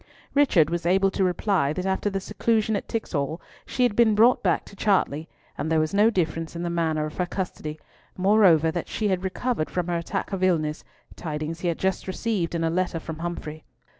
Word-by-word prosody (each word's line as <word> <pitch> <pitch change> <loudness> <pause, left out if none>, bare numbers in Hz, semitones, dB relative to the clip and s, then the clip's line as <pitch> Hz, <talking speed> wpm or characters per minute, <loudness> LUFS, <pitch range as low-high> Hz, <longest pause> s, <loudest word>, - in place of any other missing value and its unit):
Richard 190 - +4
was 170 0 -1
able 195 +2 +3
to 190 - 0
reply 180 -5 +1
that 185 +3 -4
after 190 +2 0
the 195 -1 -2
seclusion 215 +2 0
at - - -3
Tixall 160 -8 -2 0.3
she 255 - 0
had 240 -4 +2
been 225 -2 +4
brought 235 +4 +5
back 180 -3 +1
to - - -13
Chartley, 180 -7 +1 0.3
and 155 +3 -2
there 160 - +4
was 155 +2 0
no 210 +3 +5
difference 165 -5 -2
in 170 - -4
the 170 - -2
manner 160 -3 0
of 155 - -8
her 180 -1 0
custody, 155 -5 -5 0.4
moreover, 185 -5 +5
that 170 +1 -4
she 215 -2 -1
had 185 -1 0
recovered 190 -1 -1
from 180 -1 -2
her 175 - +1
attack 170 +4 -4
of 190 - -2
illness, 160 -5 +1 0.3
tidings 155 0 -4
he 175 - -2
had 170 - 0
just 190 0 -1
received 190 -3 -2
in 165 - -1
a 165 - +2
letter 175 -1 -1
from 160 0 -7
Humfrey. 160 -2 -5
180 Hz, 210 wpm, -25 LUFS, 160-200 Hz, 0.4 s, brought